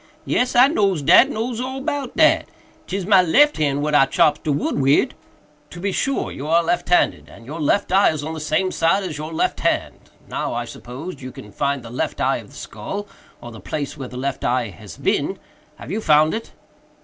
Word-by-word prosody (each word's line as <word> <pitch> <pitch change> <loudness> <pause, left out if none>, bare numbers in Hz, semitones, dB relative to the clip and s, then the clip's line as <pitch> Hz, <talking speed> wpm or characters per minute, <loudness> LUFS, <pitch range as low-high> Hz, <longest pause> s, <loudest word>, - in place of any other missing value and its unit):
"Yes, 250 0 0
I 245 +1 +8
knows 195 - +1
dat—knows 240 - +4
all 260 +1 -4
about 280 -2 -4
dat—'tis 190 0 0
my 195 -2 +6
lef 285 - +4
hand 145 -2 0
what 150 0 -1
I 135 -2 +5
chops 150 +2 +3
de 155 - 0
wood 145 0 -1
wid." 135 +1 +3 0.6
"To 175 - -10
be 195 +2 -1
sure! 275 +7 -1
you 140 - -7
are 165 +2 +3
left 175 +1 -1
handed; 175 - +2
and 115 - -14
your 155 +5 -6
left 190 +6 +1
eye 195 +2 +5
is 155 -2 -3
on 160 +2 -4
the 160 - -6
same 155 +5 0
side 165 +5 +1
as 160 -6 -5
your 155 +1 -6
left 160 - -1
hand. - - -2 0.2
Now, - - -3
I 120 0 -2
suppose, 135 +7 -9
you 130 0 -7
can 105 -3 -12
find 140 +3 -2
the 115 - -10
left 125 - -3
eye - - +1
of - - -10
the - - -17
skull, 195 - -6 0.4
or 120 - -9
the 110 - -11
place 145 -2 -4
where 135 -4 -7
the 125 - -9
left 135 +1 -3
eye 120 -2 0
has 90 - -12
been. - - 0 0.4
Have - - -10
you 220 - -2
found 155 -3 +4
it?" 225 - -5
155 Hz, 215 wpm, -21 LUFS, 140-200 Hz, 0.6 s, I